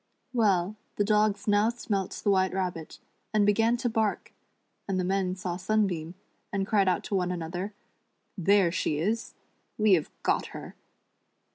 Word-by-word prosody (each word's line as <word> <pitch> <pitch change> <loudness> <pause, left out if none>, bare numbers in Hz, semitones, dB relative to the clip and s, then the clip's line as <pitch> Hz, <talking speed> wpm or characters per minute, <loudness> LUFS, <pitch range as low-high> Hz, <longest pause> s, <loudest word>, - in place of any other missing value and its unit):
Well, 205 -4 +2 0.2
the 205 - +2
dogs 210 +2 +2
now 205 +2 +4
smelt 205 -5 -2
the 205 - +3
White 190 -1 +2
Rabbit, 180 -4 -3 0.4
and 210 -1 +4
began 225 +3 +3
to 245 0 -1
bark, 220 -3 -1 0.5
and 190 -2 0
the - - 0
men 185 0 0
saw 180 -2 -4
Sunbeam, 185 -4 0 0.4
and 195 -1 -1
cried 200 -1 +2
out 180 -2 +1
to 200 - -3
one 180 -2 +1
another: 180 +4 -4 0.3
" - - -47
There 200 -4 +5
she 155 -3 -1
is," 215 +9 -2 0.2
" - - -45
We 215 -2 +4
have 160 -5 +2
got - - +1
her." - - -9
195 Hz, 165 wpm, -28 LUFS, 180-215 Hz, 0.5 s, There